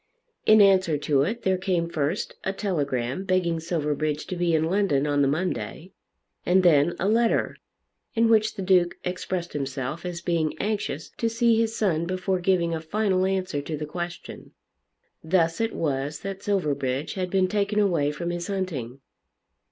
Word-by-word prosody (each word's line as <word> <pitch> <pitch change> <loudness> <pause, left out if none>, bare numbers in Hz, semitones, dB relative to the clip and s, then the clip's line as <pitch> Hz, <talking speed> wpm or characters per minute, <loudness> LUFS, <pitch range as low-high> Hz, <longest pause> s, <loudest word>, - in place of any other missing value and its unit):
In 215 0 +8
answer 190 -6 +4
to 140 -1 +1
it 215 +11 -2
there 190 -1 +1
came 180 -3 0
first 160 +3 -2
a 190 - -1
telegram 145 - -2
begging 185 -3 +1
Silverbridge 155 -2 -2
to 185 - -5
be 175 -1 +1
in 155 - +2
London 165 -5 +1
on 145 -1 +1
the 140 - +4
Monday, 175 +3 -3 0.5
and 185 +1 +3
then 165 -1 +4
a 190 - -1
letter, 230 +2 +2 0.6
in 230 0 +4
which 220 -1 +3
the 195 - -4
Duke 180 -2 +3
expressed 180 -1 -3
himself 135 +2 -4
as 175 -1 -4
being 170 -3 -1
anxious 205 -8 -3
to 230 - 0
see 230 0 +3
his 225 0 0
son 170 -7 0
before 185 0 -1
giving 175 -2 +1
a 160 - -3
final 190 +2 +1
answer 185 -6 -1
to 155 +1 -5
the 150 - -4
question. 175 +2 -7 0.7
Thus 165 +2 +1
it 225 0 0
was 145 -1 -2
that 195 -1 -5
Silverbridge 145 -8 -1
had 185 -2 -3
been 190 0 +2
taken 205 +1 -1
away 170 -8 +2
from 170 +4 -4
his 175 0 -4
hunting. 145 - -4
175 Hz, 165 wpm, -25 LUFS, 155-195 Hz, 0.7 s, In